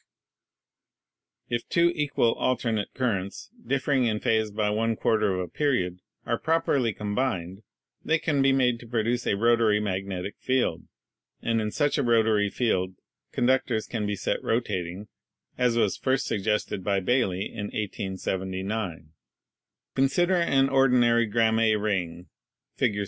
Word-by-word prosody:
If 120 -1 -3
two 170 0 +3
equal 145 -7 +1
alternate 115 -4 -1
currents, 100 -7 -2
differing 135 - +1
in 110 -2 0
phase 110 -1 +1
by 105 0 -1
one 115 +2 0
quarter 110 -2 +1
of 90 - -1
a 90 - -4
period, 90 -12 -1 0.3
are - - -1
properly 145 -7 +1
combined, 105 -3 -3 0.4
they 160 - +2
can 155 -3 0
be 135 0 +4
made 125 -3 +2
to 120 - -12
produce 120 +1 -1
a - - +2
rotatory 115 -1 +3
magnetic 95 -1 -3
field. 125 -10 0 0.6
And 115 -1 +1
in 105 - -1
such 145 +5 0
a - - +1
rotatory 110 -3 +3
field 95 -6 -1 0.4
conductors 125 -3 +1
can 110 -3 -3
be 105 - -1
set - - -2
rotating, 100 -4 -2 0.5
as 125 -2 +1
was 105 -5 +1
first 130 0 0
suggested 105 -2 -1
by 100 0 +1
Baily 100 -3 0
in 105 - -4
1879. 95 -2 -4 0.8
"Consider 175 +8 +2
an 135 -6 +3
ordinary 125 -4 +3
Gramme 110 0 +3
ring 90 -5 -2 0.5
(Fig. 105 -1 0
110 Hz, 135 wpm, -26 LUFS, 100-125 Hz, 0.8 s, be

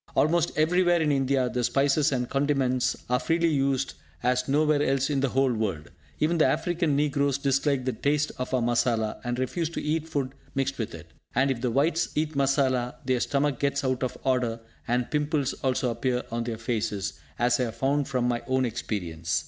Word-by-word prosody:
Almost 165 +1 +2
everywhere 175 +2 +3
in 155 -2 +2
India, 135 -2 +2
the 125 0 -2
spices 140 +4 +2
and 125 -2 -1
condiments 135 -3 +1
are 125 0 +2
freely 165 +3 +1
used, 135 -3 0 0.3
as 125 +1 +1
nowhere 150 +1 +3
else 135 0 +1
in 140 - +1
the 135 0 +1
whole 135 0 +2
world. 95 -10 -3 0.3
Even 165 +2 +1
the 155 - +5
African 165 +1 0
negroes 140 -1 +1
dislike 140 -1 +1
the 130 - 0
taste 145 +6 0
of 125 - -3
our 130 -2 +1
masala, 115 -2 0
and 120 0 -2
refuse 155 +6 -1
to 170 - -4
eat 160 +1 -2
food 135 -4 -2 0.2
mixed 135 -1 -1
with 110 - -3
it. - - -12 0.2
And 135 +3 +3
if 120 -3 -3
the 125 - 0
Whites 155 +7 +1
eat 155 +1 0
masala, 135 -3 +1
their 130 -1 +1
stomach 140 0 0
gets 140 0 0
out 130 -1 0
of 130 - -2
order, 125 -4 0 0.3
and 120 0 0
pimples 150 -2 0
also 130 -2 +1
appear 125 +2 -1
on 115 0 -2
their 115 -2 -3
faces, 110 -3 -2 0.2
as 120 +1 +2
I 125 - +2
have 115 -1 -6
found 140 +1 0
from 125 -2 0
my 120 -1 0
own 130 0 +2
experience. 85 -8 -2
135 Hz, 195 wpm, -27 LUFS, 125-145 Hz, 0.3 s, the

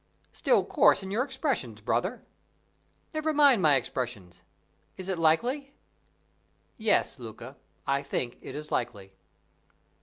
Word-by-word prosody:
"Still - - +2
coarse - - +4
in 190 - -6
your 225 +5 +1
expressions, 265 - -2
brother!" 185 - -1 0.9
"Never 310 0 0
mind 285 -7 +6
my 150 -4 +5
expressions. 115 -9 -4 0.6
Is 185 - -6
it 190 -3 -2
likely?" 250 - +1 1.0
"Yes, 210 -10 +1
Luca, 120 +3 -9 0.3
I 140 0 +1
think 125 -3 -3
it - - -8
is 150 0 -7
likely." 100 -5 -3
155 Hz, 120 wpm, -28 LUFS, -, 1.0 s, mind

